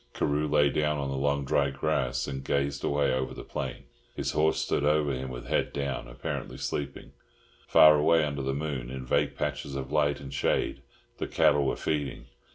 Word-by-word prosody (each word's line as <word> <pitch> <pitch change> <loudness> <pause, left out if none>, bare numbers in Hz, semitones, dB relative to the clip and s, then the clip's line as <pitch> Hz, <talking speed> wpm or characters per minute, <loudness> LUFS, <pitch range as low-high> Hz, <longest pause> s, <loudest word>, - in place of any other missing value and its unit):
Carew 75 +1 0
lay 75 -1 +3
down 75 +1 +1
on 70 -1 -2
the - - -2
long 70 +1 0
dry 70 0 +2
grass 70 -2 -1
and 65 -1 -5
gazed 70 +1 -1
away 70 -2 +1
over 65 0 -2
the - - -7
plain. - - -5 0.3
His - - -2
horse 80 +1 +2
stood - - 0
over 75 -1 +2
him 65 +1 -4
with - - -7
head - - 0
down, 70 -3 -3
apparently - - -5
sleeping. 70 -1 -4 0.6
Far 75 -1 +8
away 80 +2 +4
under 70 -1 -2
the 70 0 -1
moon, 70 -5 -3
in 65 0 -6
vague 70 +2 +1
patches 70 - -3
of 65 0 -5
light 75 -1 +2
and 70 -1 -8
shade, 65 - 0 0.4
the - - -2
cattle 70 -1 +3
were - - 0
feeding. 75 -3 -2
70 Hz, 190 wpm, -28 LUFS, 65-75 Hz, 0.6 s, Far